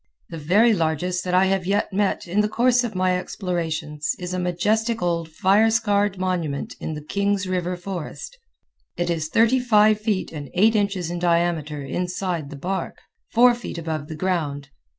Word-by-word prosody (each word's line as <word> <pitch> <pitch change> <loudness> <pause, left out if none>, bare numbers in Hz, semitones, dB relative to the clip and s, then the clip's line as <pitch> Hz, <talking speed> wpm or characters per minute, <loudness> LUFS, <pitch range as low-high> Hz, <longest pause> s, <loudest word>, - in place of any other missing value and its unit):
The 165 - -7
very 205 +10 +4
largest 175 +1 -1
that 180 0 0
I 185 +1 +5
have 190 -1 0
yet 200 0 0
met 200 -1 0
in 185 +4 0
the 210 - 0
course 245 +2 +3
of 225 -4 -4
my 185 0 +1
explorations 160 -5 -3
is 180 0 -5
a 185 - -1
majestic 215 +6 0
old 170 -2 -1
fire 195 +7 +3
scarred 205 -3 +1
monument 175 -6 -2
in 155 - -4
the 150 - -7
Kings 200 +4 0
River 180 -1 -2
forest. 185 - -6 0.6
It 175 0 0
is 160 -2 -2
thirty 230 +8 +3
five 215 -3 +4
feet 210 -4 -1
and 145 -4 -7
eight 220 +5 +4
inches 195 -5 0
in 175 - -3
diameter 170 -4 0
inside 180 +1 -3
the 145 - -8
bark, 185 +7 -4 0.3
four 245 +1 +6
feet 240 -7 -7
above 160 -3 -4
the 155 - -6
ground. 150 -5 -2
180 Hz, 175 wpm, -23 LUFS, 165-205 Hz, 0.6 s, four